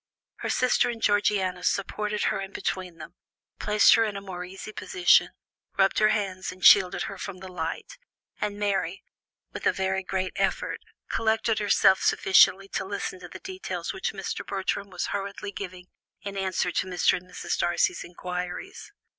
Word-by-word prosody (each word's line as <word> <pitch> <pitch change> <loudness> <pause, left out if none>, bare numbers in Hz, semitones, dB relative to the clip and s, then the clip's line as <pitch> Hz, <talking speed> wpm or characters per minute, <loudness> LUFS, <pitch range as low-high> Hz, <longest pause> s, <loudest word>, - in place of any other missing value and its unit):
Her - - -4
sister 250 -1 +2
and 235 -1 -4
Georgiana 205 -4 +1
supported 210 +2 -1
her 195 - 0
in 195 0 -7
between 180 -3 -3
them, - - -10 0.5
placed 210 0 +5
her 230 - +5
in 210 -3 -2
a - - -3
more 185 -3 -7
easy 190 +4 -8
position, 360 - +3 0.5
rubbed 195 0 +3
her 215 - +5
hands 195 -4 -1
and 185 0 -5
shielded 185 -3 +7
her 195 - -6
from 200 -2 -6
the 190 +1 -9
light; 175 - -5 0.4
and 205 -1 -2
Mary, 195 -3 -1 0.5
with - - -2
a - - +5
very 190 0 -1
great 185 0 -3
effort, - - -1 0.3
collected 220 0 +1
herself 200 -2 +4
sufficiently 195 0 +4
to - - -2
listen 195 -1 -4
to 180 - -9
the - - -9
details 380 +2 -5
which - - -2
Mr. - - -5
Bertram 200 +1 -3
was 180 -1 -3
hurriedly 200 0 -4
giving 185 -2 -7 0.4
in 200 -1 -5
answer 190 -1 -1
to - - -1
Mr. 180 -1 +2
and 180 0 -13
Mrs. 180 - -3
Darcy's 175 0 +1
inquiries. 180 - -6
195 Hz, 170 wpm, -26 LUFS, 185-210 Hz, 0.5 s, shielded